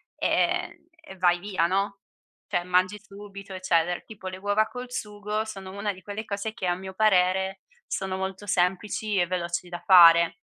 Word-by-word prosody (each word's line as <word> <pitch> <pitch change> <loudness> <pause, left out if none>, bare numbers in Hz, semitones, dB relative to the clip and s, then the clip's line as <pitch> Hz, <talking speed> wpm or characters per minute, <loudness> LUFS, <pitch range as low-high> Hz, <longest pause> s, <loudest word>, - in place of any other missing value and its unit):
e - - 0 0.2
e 315 -11 -12
vai 175 -1 +3
via, 190 -3 0
no, 195 +2 -1 0.5
cioè, 175 - -1
mangi 185 +3 +1
subito 200 -1 -11
eccetera. 175 -2 +1
Tipo, 205 -4 -11
le 185 0 -5
uova 205 +3 +1
col 250 0 -8
sugo 210 -1 -3
sono 195 -3 -8
una 200 +1 -2
di 190 - -14
quelle 205 +2 -5
cose 205 +2 -4
che, 190 -5 -4
a 175 - +1
mio 190 +1 -8
parere, 190 -1 +2 0.3
sono 190 -1 -3
molto 190 +1 -5
semplici 195 +3 0
e 175 - +3
veloci 175 0 -3
da 175 0 -6
fare. 170 -2 +7
190 Hz, 170 wpm, -26 LUFS, 180-205 Hz, 0.5 s, fare